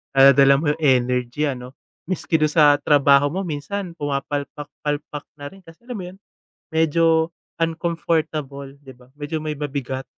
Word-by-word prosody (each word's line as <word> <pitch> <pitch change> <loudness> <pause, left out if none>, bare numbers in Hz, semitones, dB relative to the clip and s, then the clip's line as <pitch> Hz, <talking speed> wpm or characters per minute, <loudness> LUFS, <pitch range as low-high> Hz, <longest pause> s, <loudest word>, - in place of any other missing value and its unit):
Daladala 135 0 +7
mo 155 - -3
yung 160 - -12
energy 125 0 +1
ano? 125 -3 -4 0.4
Miski 165 -3 -1
dun 155 - +3
sa 150 -1 +5
trabaho 145 -1 +4
mo, 190 +6 -3
minsan 175 +4 -5
pumapalpak-palpak 145 0 -4
na 145 - -9
rin. 195 - -16
Kasi 170 +6 -18
alam 250 - -6
mo 205 -5 -6
'yon, 185 - -15 0.5
medyo 160 +1 +2 0.2
uncomfortable 160 -4 -2
'di 135 -2 -14
ba? 125 0 -21
Medyo 155 +2 -4
may 155 -1 -4
mabigat. 135 -2 -4
150 Hz, 145 wpm, -21 LUFS, 140-165 Hz, 0.5 s, Daladala